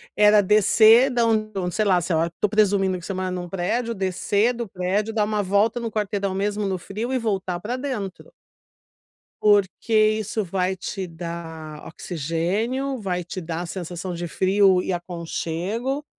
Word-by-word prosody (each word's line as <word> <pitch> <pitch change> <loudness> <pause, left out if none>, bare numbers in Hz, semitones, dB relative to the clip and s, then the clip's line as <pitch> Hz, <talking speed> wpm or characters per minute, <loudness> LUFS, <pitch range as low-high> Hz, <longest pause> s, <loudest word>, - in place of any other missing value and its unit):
era 210 0 +6
descer 215 +5 +6
da 240 -2 +1
onde 215 -1 +1
do 180 -2 -2
sei 215 +3 0
lá 185 -3 +4
sei 175 0 -1
lá, 165 +1 +1
tô 210 - +2
presumindo 195 -3 +2
que 175 - -11
você 195 - -3
mora 185 0 -2
num 180 -1 -5
prédio, 230 +6 -1
descer 200 +4 +1
do 235 -1 -5
prédio, 195 +4 -1
dar 215 -1 +2
uma 210 0 0
volta 205 +4 +2
no 235 -1 -3
quarteirão, 200 -2 -2
mesmo 205 +1 -1
no 190 -1 -1
frio 210 +7 -5
e - - +2
voltar 195 -6 -2
pra 230 +7 -3
dentro. 255 - -5 1.1
Porque 205 +2 +2 0.3
isso 215 +1 -2
vai 185 0 -1
te 190 0 -5
dar 165 -2 -7
oxigênio, 185 - -2
vai 180 -4 -2
te 180 +3 -6
dar 165 -1 -4
a - - -4
sensação 180 +1 -5
de 175 0 -4
frio 190 +2 +3
e - - -2
aconchego, 180 - -3
195 Hz, 170 wpm, -23 LUFS, 180-215 Hz, 1.1 s, era